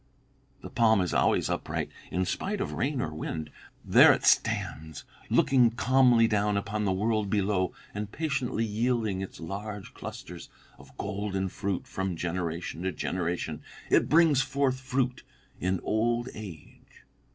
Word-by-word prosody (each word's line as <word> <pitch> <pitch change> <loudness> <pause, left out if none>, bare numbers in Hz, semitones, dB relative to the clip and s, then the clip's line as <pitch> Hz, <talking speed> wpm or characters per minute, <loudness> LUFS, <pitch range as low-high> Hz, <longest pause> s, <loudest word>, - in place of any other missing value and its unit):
The - - -8
palm 110 -3 +4
is 90 - -1
always - - +2
upright, - - -3 0.2
in 90 0 0
spite 200 - -2
of 200 - -3
rain 140 -1 -1
or 80 - -3
wind. 80 0 -5 0.3
'There - - +8
it - - -3
stands, 80 0 +1 0.3
looking 125 -3 +4
calmly 120 -1 +4
down 105 -1 +1
upon 105 +1 -2
the 95 - +2
world 105 +2 0
below, 95 -2 +1 0.2
and 105 0 -5
patiently 140 -7 -1
yielding 110 -2 0
its 95 - -7
large 100 +4 -6
clusters - - -9 0.3
of - - -17
golden 100 -2 -2
fruit 100 -1 -3
from 95 -2 -3
generation 85 0 -3
to 95 +1 -1
generation. 85 -4 -3 0.3
It - - +4
brings 155 -4 +5
forth 135 -2 0
fruit 130 -1 -1 0.4
in 95 0 0
old 120 +3 0
age.' 95 -8 -12
105 Hz, 140 wpm, -28 LUFS, 95-120 Hz, 0.4 s, There